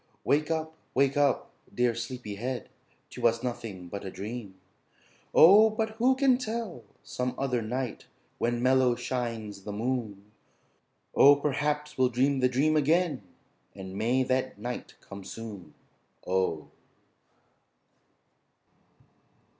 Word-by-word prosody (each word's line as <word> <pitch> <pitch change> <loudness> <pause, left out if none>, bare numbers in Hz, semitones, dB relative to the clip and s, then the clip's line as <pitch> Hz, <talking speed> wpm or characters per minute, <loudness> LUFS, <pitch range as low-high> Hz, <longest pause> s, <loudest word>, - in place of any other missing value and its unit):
Wake 150 +2 +2
up, 160 -1 -2 0.2
wake 135 +1 +3
up, 145 -2 +1 0.2
dear 120 -1 +1
Sleepy 120 -2 -6
Head, 120 +5 -4 0.4
'Twas 115 0 +1
nothing 110 -7 -5
but 100 +3 -6
a 95 - -5
dream, 105 +1 -7 0.8
oh. 205 +6 +8
But 220 0 -2
who 255 +3 +4
can 260 -2 +3
tell? 220 - -4 0.2
Some 125 0 -3
other 125 -3 0
night 125 +2 -4 0.3
When 120 0 0
mellow 130 -1 +4
shines 115 -6 -4
the 105 - -6
moon, 105 -2 -3 0.8
oh, 145 +1 +8
Perhaps 150 +1 -2
we'll 130 -1 +4
dream 135 +3 +1
the 125 0 +3
dream 145 +5 +2
again 155 - +2 0.5
And 95 -1 -8
may 120 +5 +1
that 130 -1 -1
night 120 +4 -6
come 100 0 -10
soon, 100 -5 -9 0.5
oh! 90 -4 -1
125 Hz, 120 wpm, -28 LUFS, 110-145 Hz, 0.8 s, oh